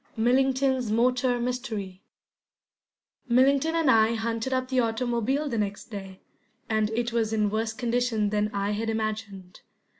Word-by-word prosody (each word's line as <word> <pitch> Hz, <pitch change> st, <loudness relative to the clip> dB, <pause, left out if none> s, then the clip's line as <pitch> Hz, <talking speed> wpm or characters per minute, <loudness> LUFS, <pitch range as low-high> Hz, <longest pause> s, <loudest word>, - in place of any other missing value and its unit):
MILLINGTON'S 260 Hz, +1 st, +2 dB
MOTOR 245 Hz, +2 st, +2 dB
MYSTERY 230 Hz, -7 st, -4 dB, 1.3 s
MILLINGTON 275 Hz, +6 st, +3 dB
and 320 Hz, -5 st, +3 dB
I 225 Hz, 0 st, +4 dB
hunted 230 Hz, +2 st, -2 dB
up 255 Hz, 0 st, -1 dB
the 260 Hz, -1 st, +1 dB
automobile 240 Hz, +4 st, 0 dB
the 235 Hz, -5 st, -2 dB
next 205 Hz, +2 st, -4 dB
day, 195 Hz, -2 st, -8 dB, 0.5 s
and 215 Hz, -1 st, +1 dB
it 240 Hz, 0 st, -1 dB
was 225 Hz, -2 st, 0 dB
in 210 Hz, -2 st, +1 dB
worse 220 Hz, +1 st, -1 dB
condition 235 Hz, -3 st, 0 dB
than 210 Hz, 0 st, +1 dB
I 200 Hz, 0 st, -1 dB
had 220 Hz, +2 st, -2 dB
imagined. 215 Hz, -4 st, -4 dB
230 Hz, 140 wpm, -26 LUFS, 215-250 Hz, 1.3 s, I